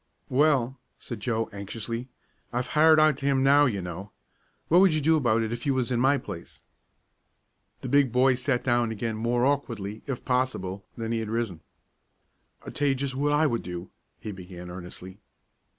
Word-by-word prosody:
"Well," 135 -2 +2 0.2
said 120 -4 -7
Joe, 115 0 -1
anxiously, 115 +4 -5 0.4
"I've 120 +1 -1
hired 155 +1 +6
out 155 -3 +4
to 140 - -3
him 135 -1 +2
now, 145 +1 +6
you 100 -6 -2
know. 90 +3 -6 0.6
What 175 +3 +5
would 190 -5 +5
you - - +2
do 160 +2 +3
about 115 -6 +2
it 110 +1 -3
if 120 - -5
you 135 - +2
was 130 -1 -1
in 120 - +1
my 135 +3 +4
place?" 85 -10 -9 1.2
The - - -5
big 140 -1 +3
boy 130 +2 +4
sat 125 0 -1
down 120 -2 +1
again 110 +1 -3
more 120 +3 +1
awkwardly, 115 -7 -2
if 135 -3 -4
possible, 125 -7 -1
than 115 -1 -3
he 115 - 0
had 110 -1 -4
risen. 110 -7 -2 1.0
"I'll - - -6
tell 145 - 0
ye 135 - +3
jest 135 0 -3
what 145 +3 0
I 150 +2 +3
would 120 -6 0
do," 90 +1 -7 0.3
he 105 - -6
began 90 -2 -9
earnestly. 90 +1 -9
120 Hz, 185 wpm, -27 LUFS, 110-140 Hz, 1.2 s, hired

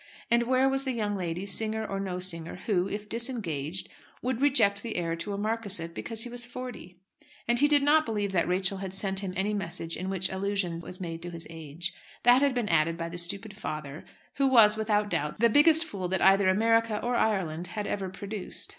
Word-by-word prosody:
And 235 0 +3
where 260 +1 +3
was 270 0 0
the 265 -2 -2
young 210 -3 -1
lady, 180 0 -3
singer 220 +2 +1
or 195 -2 -3
no 190 -2 -3
singer, 165 -3 -2
who 190 -4 +1
if 205 +1 -5
disengaged, 190 - -3 0.4
would 255 0 -1
reject 225 -8 +4
the 230 -2 -5
heir 165 -1 -1
to 205 +5 -4
a - - -3
marquisate 205 -6 -2
because 225 +5 -2
he 245 - -6
was 240 0 -2
forty? 245 -8 -8 0.5
And 240 0 +2
he 290 - +5
did 290 -1 +5
not 305 +2 +5
believe 205 -3 -1
that 170 -4 +1
Rachel 190 +2 0
had 190 -1 -4
sent 195 -1 0
him 195 -2 -4
any 195 +3 0
message 170 -4 -3
in 185 +1 -4
which 190 -1 0
allusion 190 -3 -2
was 180 +2 -8
made 165 -2 -5
to 175 - -6
his 170 -1 -4
age. 165 +2 -3 0.3
That 245 +2 +6
had 280 -2 +2
been 240 -3 0
added 165 -2 +2
by 165 0 -4
the 175 +1 -5
stupid 195 +4 -3
father, 155 -7 -6 0.3
who 275 0 +3
was, 225 -5 +6
without 210 -1 +1
doubt, 150 +5 -2
the 235 0 +4
biggest 320 +5 +6
fool 195 - -4
that 190 0 -1
either 195 0 +5
America 225 +2 +2
or 245 +1 0
Ireland 180 -7 0
had 205 +4 -4
ever 195 -2 -3
produced. 200 +1 -6
200 Hz, 215 wpm, -28 LUFS, 180-230 Hz, 0.5 s, That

